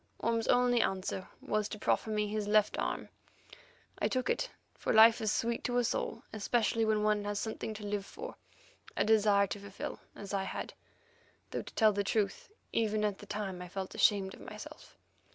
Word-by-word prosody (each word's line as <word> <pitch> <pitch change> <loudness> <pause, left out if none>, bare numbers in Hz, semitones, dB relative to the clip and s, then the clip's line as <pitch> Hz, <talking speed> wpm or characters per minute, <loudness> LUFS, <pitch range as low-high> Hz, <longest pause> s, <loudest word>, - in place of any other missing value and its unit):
Orme's 230 -1 0
only 245 -1 +4
answer 190 0 -2
was 215 -1 -1
to - - -5
proffer 220 - +1
me 210 -1 0
his 210 0 -2
left 210 0 +4
arm. - - -2 0.9
I - - +2
took 255 -1 0
it, - - -1 0.2
for - - -2
life 225 +1 +7
is 215 -1 +1
sweet 230 +1 0
to 245 0 +1
us 245 -2 +2
all, - - -3
especially 225 +1 +1
when 215 -1 +2
one 210 -1 +2
has 205 0 -2
something 220 0 -4
to 210 0 -7
live 205 -1 -1
for—a - - -7
desire 210 -2 +5
to 200 +1 -5
fulfil 200 -1 -6 0.2
as 200 0 -7
I 195 -1 0
had, - - -5 0.8
though - - -2
to - - -11
tell 215 -2 +5
the 200 0 0
truth, 200 - -1 0.2
even 215 -1 +1
at 205 -2 -1
the 205 - -11
time 195 -3 -4
I 180 - -6
felt 190 +1 -5
ashamed 195 -2 +3
of - - -12
myself. - - -10
210 Hz, 190 wpm, -32 LUFS, 200-225 Hz, 0.9 s, life